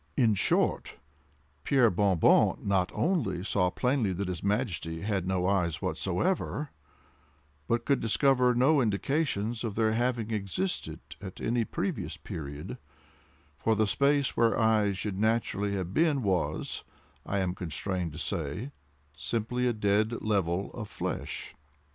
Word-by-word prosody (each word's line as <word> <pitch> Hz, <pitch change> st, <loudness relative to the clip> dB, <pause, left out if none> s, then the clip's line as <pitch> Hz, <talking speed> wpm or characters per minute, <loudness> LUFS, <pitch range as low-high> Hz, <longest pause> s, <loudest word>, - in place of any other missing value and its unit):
In 115 Hz, -5 st, +4 dB
short, 100 Hz, -, +1 dB, 0.7 s
Pierre 130 Hz, -5 st, +4 dB
Bon 95 Hz, 0 st, +2 dB
Bon -, -, +5 dB
not 95 Hz, -3 st, +1 dB
only 120 Hz, -, 0 dB
saw 95 Hz, -2 st, +1 dB
plainly 125 Hz, 0 st, +1 dB
that 95 Hz, +1 st, -3 dB
his 90 Hz, -3 st, -4 dB
Majesty 100 Hz, -6 st, -1 dB
had 100 Hz, -3 st, -1 dB
no 95 Hz, -1 st, 0 dB
eyes 90 Hz, -5 st, +1 dB
whatsoever, 150 Hz, -, -1 dB, 1.0 s
but 115 Hz, 0 st, 0 dB
could 140 Hz, -1 st, +2 dB
discover 125 Hz, +2 st, +3 dB
no 135 Hz, +4 st, +4 dB
indications 115 Hz, 0 st, 0 dB
of 110 Hz, -4 st, -3 dB
their 110 Hz, -1 st, +2 dB
having 115 Hz, -1 st, 0 dB
existed 95 Hz, -3 st, -3 dB, 0.2 s
at 95 Hz, -2 st, -8 dB
any 120 Hz, 0 st, +1 dB
previous -, -, -3 dB
period—for 75 Hz, +8 st, -6 dB
the 110 Hz, +1 st, +3 dB
space 140 Hz, +5 st, +2 dB
where 115 Hz, -1 st, +3 dB
eyes 110 Hz, -3 st, +3 dB
should 100 Hz, -2 st, -3 dB
naturally 105 Hz, -2 st, +1 dB
have 95 Hz, -1 st, -3 dB
been 150 Hz, -3 st, +2 dB
was, 90 Hz, -6 st, -1 dB, 0.4 s
I 100 Hz, -, -2 dB
am 95 Hz, -2 st, 0 dB
constrained 90 Hz, 0 st, -3 dB
to -, -, -8 dB
say, 85 Hz, -, -3 dB, 0.4 s
simply 120 Hz, +8 st, -1 dB
a -, -, +3 dB
dead 105 Hz, +2 st, +1 dB
level 95 Hz, -3 st, 0 dB
of 105 Hz, -4 st, -6 dB
flesh. -, -, -4 dB
105 Hz, 135 wpm, -29 LUFS, 95-120 Hz, 1.0 s, Bon